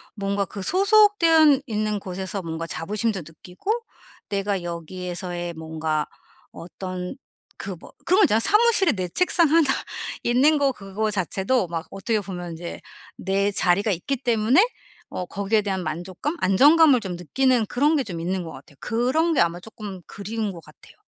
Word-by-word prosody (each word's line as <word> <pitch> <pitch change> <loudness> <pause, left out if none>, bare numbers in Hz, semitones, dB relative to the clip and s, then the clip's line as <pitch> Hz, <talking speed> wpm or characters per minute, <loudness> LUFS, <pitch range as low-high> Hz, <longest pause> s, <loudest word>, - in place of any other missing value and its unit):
뭔가 200 -1 -1
그 200 - -8
소속되어 355 - +5
있는 215 -2 -1
곳에서 190 0 -5
뭔가 165 -1 -5
자부심도 210 +4 -2
느끼고 180 - -6 0.6
내가 195 -2 -1
여기에서의 175 +1 -5
뭔가 160 -1 -3 0.4
어떤 180 +3 -7 0.4
그 195 -1 -5
뭐 - - -14
그런 370 +4 +4
거 - - +7
있잖아요. 220 - +4
사무실에 420 - +4
내 185 -4 -3
책상 345 - +2
하나 320 -1 +4 0.6
있는 265 +6 +4
거 280 -1 +2
그거 210 -1 -3
자체도 195 +3 0
막 165 0 -5
어떻게 210 +2 -1
보면 180 -3 -6
인제 170 +1 -7 0.4
내 195 +2 0
자리가 200 +2 +2
있기 190 +10 -1
때문에 245 - +3 0.5
어 180 - -4
거기에 200 +4 0
대한 190 -2 -2
만족감, 175 - -4
안정감을 285 - +6
좀 185 -4 -5
느끼는 245 - +1
그런 290 +9 +2
게 275 - +1
좀 175 -5 -5
있는 185 +2 -2
것 160 - -7
같아요. 140 +2 -14
그런 260 +9 +1
게 - - +3
아마 170 +1 +1
조금 205 -1 -9
그리운 210 +1 -4
것 170 - -10
같아요. - - -19
200 Hz, 330 characters per minute, -24 LUFS, 180-260 Hz, 0.6 s, 거